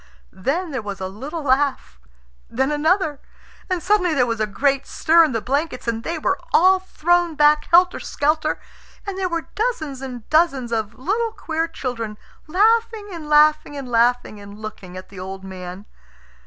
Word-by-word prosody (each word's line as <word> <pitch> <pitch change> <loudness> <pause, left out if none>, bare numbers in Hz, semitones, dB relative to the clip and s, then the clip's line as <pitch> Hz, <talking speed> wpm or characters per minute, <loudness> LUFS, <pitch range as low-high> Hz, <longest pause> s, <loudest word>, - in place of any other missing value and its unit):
Then 315 - -2
there 265 -4 -3
was 200 -2 -6
a 190 - -3
little 280 - -6
laugh. 265 - 0 0.5
Then 265 +5 0
another. 310 0 +1 0.5
And 360 -3 -1
suddenly 365 -5 +2
there 250 -3 +3
was 230 -2 -2
a 215 - +1
great 275 +6 0
stir 335 0 +4
in 310 - +1
the 225 -2 -1
blankets, 275 -2 -2
and 230 -1 -1
they 335 +4 -3
were - - 0
all 375 +2 +5
thrown 350 -2 +1
back 300 0 +4
helter 360 +1 +4
skelter, 305 +1 0 0.5
and 400 -2 -4
there 375 -1 -1
were 335 -1 -3
dozens 315 - -2
and 250 -4 -7
dozens 275 -7 +2
of 220 -1 -2
little 435 - -1
queer 325 -3 -2
children, 230 -8 -5 0.3
laughing 440 +4 +2
and 320 -4 -8
laughing 300 -1 +4
and 275 -2 -6
laughing, 240 -2 +1
and 200 0 -11
looking 200 -4 -9
at 185 - -10
the 195 - -11
old 190 +1 -7
man. 185 +1 -8
290 Hz, 170 wpm, -21 LUFS, 230-335 Hz, 0.5 s, all